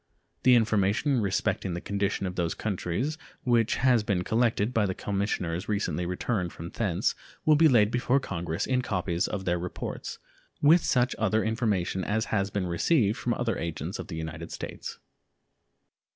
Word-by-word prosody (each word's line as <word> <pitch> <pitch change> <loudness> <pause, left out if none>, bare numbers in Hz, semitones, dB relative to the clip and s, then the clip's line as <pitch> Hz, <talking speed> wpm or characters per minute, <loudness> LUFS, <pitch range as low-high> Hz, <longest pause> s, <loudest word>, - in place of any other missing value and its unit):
The 125 -1 +6
information 115 +4 +2
respecting 95 -2 0
the - - -3
condition 100 +1 -1
of 90 - -3
those 85 -3 -1
countries 110 - -2 0.2
which 120 -2 +3
has 125 -3 +4
been 100 -4 0
collected 115 +1 +1
by 110 -4 +2
the 95 - -2
commissioners 100 -3 -2
recently 100 -4 -1
returned 90 0 -1
from 85 +1 -7
thence 95 -7 0 0.3
will 155 - +6
be 160 +2 +6
laid 110 -6 +4
before 125 +2 +2
Congress 85 -8 -3
in 130 -1 +1
copies 90 -6 -1
of 95 -2 -4
their 90 -1 +1
reports, 90 +1 -5 0.4
with 160 +4 +6
such 125 -1 +2
other 110 0 +2
information 105 -5 0
as 110 +3 0
has 100 -2 +1
been 100 -2 -2
received 105 - +2
from 120 - 0
other 120 -2 -1
agents 85 -1 -4
of - - -6
the 80 - -6
United 80 -1 -6
States. - - -6
105 Hz, 165 wpm, -28 LUFS, 90-120 Hz, 0.4 s, The